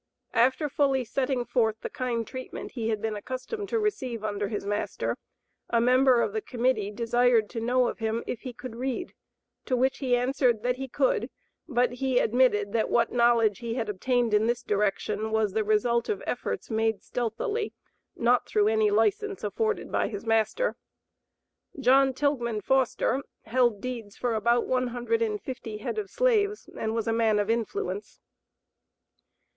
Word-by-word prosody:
After 260 +6 +3
fully 275 -3 +1
setting 255 0 -1
forth 220 -3 +1
the - - -4
kind 240 -3 -2
treatment 255 +2 -7
he 225 -3 -3
had 215 -2 -2
been 220 -1 -1
accustomed 260 - -5
to 460 - +1
receive 260 - -2
under 205 -1 -2
his 205 -1 -4
master, 205 +1 -2 0.5
a 235 - +3
member 250 0 +4
of 425 - -2
the 435 - -1
Committee 245 - 0
desired 235 0 +2
to 235 - -4
know 250 +2 +2
of - - -4
him 225 +1 -1
if 245 - -4
he 255 - -6
could 245 -1 -9
read, 265 +7 -3 0.5
to 255 - 0
which 265 +2 +1
he 255 -3 +2
answered 245 -2 +1
that 250 0 0
he 270 0 -4
could, - - +1 0.4
but 250 -4 +2
he 255 0 -1
admitted 220 -5 +3
that 225 -1 +1
what 235 -1 +2
knowledge 235 -3 +3
he 235 -1 -4
had 225 -4 -2
obtained 240 +3 0
in 210 +2 +4
this 240 +1 0
direction 210 +1 0
was 220 -3 +1
the 220 0 +1
result 225 +3 +1
of 425 - -2
efforts - - -3
made 220 -1 0
stealthily, 245 - -2 0.4
not 240 +1 +2
through 210 0 +3
any 220 -1 +3
license 225 - +1
afforded 440 -1 -1
by - - +1
his 205 0 -6
master. 225 - +1 1.0
John 265 0 +4
Tilghman 245 -6 0
Foster 265 +2 +1 0.2
held 235 -3 +1
deeds 235 -5 -6
for 245 -2 -1
about 235 +2 +2
one 255 0 +1
hundred 240 -1 -1
and 215 -2 0
fifty 235 -4 -6
head 325 - -3
of 405 -2 -5
slaves, 425 -4 +1
and 220 0 -2
was 225 -1 -1
a 225 - +2
man 225 -2 +3
of 205 +1 +1
influence. 210 -3 -3
240 Hz, 170 wpm, -27 LUFS, 220-260 Hz, 1.0 s, member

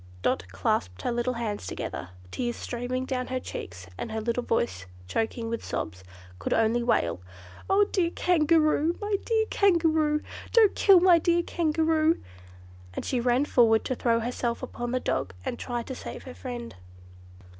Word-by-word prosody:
Dot 90 +1 0
clasped 90 -1 -1
her 245 - 0
cold 250 +1 -1
hands 215 -3 -3
together. 90 - -5 0.2
Tears 240 -1 -2
streamed 255 +2 -3
down 255 -1 -2
her 255 0 -2
cheeks, 90 - -7
and - - -4
her 220 - -2
little 235 +2 -1
voice, 95 - -1 0.2
choking 225 - -2
with 230 0 -3
sobs, 90 -3 -4 0.4
could 90 - -1
only 225 +2 +2
wail, 85 - +1 0.5
"Oh! 390 +1 +5
dear 350 -4 +2
Kangaroo! 325 -1 +2
my 415 -1 0
dear 445 -1 +2
Kangaroo! 320 -5 +3 0.3
Don't 445 -4 +6
kill 385 -4 +6
my 355 -2 +6
dear 345 +1 +2
Kangaroo!" 320 -1 +2 0.8
and - - -4
she 255 - 0
ran 245 +3 +2
forward 225 -5 +4
to - - 0
throw 230 -2 +1
herself 235 0 -2
upon 240 0 -4
the 255 +1 0
dog 95 - -2
and - - -3
try 240 -2 -3
to 260 - -6
save - - -8
her 255 - -9
friend. 245 -2 -7
250 Hz, 165 wpm, -27 LUFS, 230-320 Hz, 0.8 s, Don't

